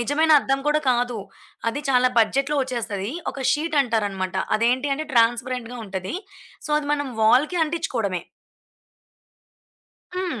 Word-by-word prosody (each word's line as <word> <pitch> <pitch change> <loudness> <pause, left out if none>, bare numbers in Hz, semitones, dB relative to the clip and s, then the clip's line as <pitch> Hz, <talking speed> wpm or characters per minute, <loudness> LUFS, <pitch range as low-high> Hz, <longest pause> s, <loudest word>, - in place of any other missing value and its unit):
నిజమైన 300 +7 +2
అద్దం 270 0 0
కూడా 300 +1 +3
కాదు. 245 -1 0 0.5
అది 285 +6 -3
చాలా 255 -1 +4
బడ్జెట్‌లో 275 +6 +2
ఒచ్చేస్తది. 225 -5 -3 0.2
ఒక 275 - -8
షీటంటారన్నమాట. 225 - 0 0.2
అదేంటి 250 +5 +1
అంటే, 310 +2 -5
ట్రాన్స్‌పరెంట్‌గా 240 +1 +1
ఉంటది. 190 - -5 0.5
సో, - - -6
అది 290 - -5
మనం 285 -2 -1
వాల్‌కి 285 +10 +4
అంటించుకోవడమే. 245 - -2 1.9
హ్మ్. 355 -11 -2
255 Hz, 115 wpm, -23 LUFS, 225-295 Hz, 1.9 s, చాలా